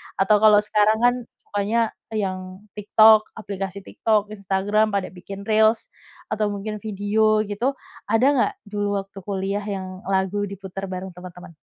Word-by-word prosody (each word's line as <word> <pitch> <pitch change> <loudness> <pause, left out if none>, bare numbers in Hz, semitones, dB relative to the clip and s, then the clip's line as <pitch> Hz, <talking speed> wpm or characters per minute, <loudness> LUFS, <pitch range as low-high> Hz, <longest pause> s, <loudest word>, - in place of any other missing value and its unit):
atau 200 +2 +3
kalau 210 -1 +6
sekarang 215 +1 +2
kan 245 0 +5 0.3
sukanya 215 +3 +1 0.3
yang 185 -1 -4
TikTok 215 +1 +5
aplikasi 200 -2 -5
TikTok, 210 -2 0
Instagram 200 +1 0
pada 195 - -1
bikin 195 +2 -9
reels, 220 +1 +3 0.4
atau 215 0 0
mungkin 210 +1 -5
video 215 +1 +1
gitu 220 +7 -1 0.3
ada 225 +4 +2
nggak 405 +11 +2 0.2
dulu 205 -1 -1
waktu 195 0 -18
kuliah 200 +1 -2
yang 185 -2 -6
lagu 195 +1 0
diputar 195 0 -7
bareng 185 0 -6
teman-teman? 180 -1 -11
205 Hz, 140 wpm, -23 LUFS, 195-215 Hz, 0.4 s, kalau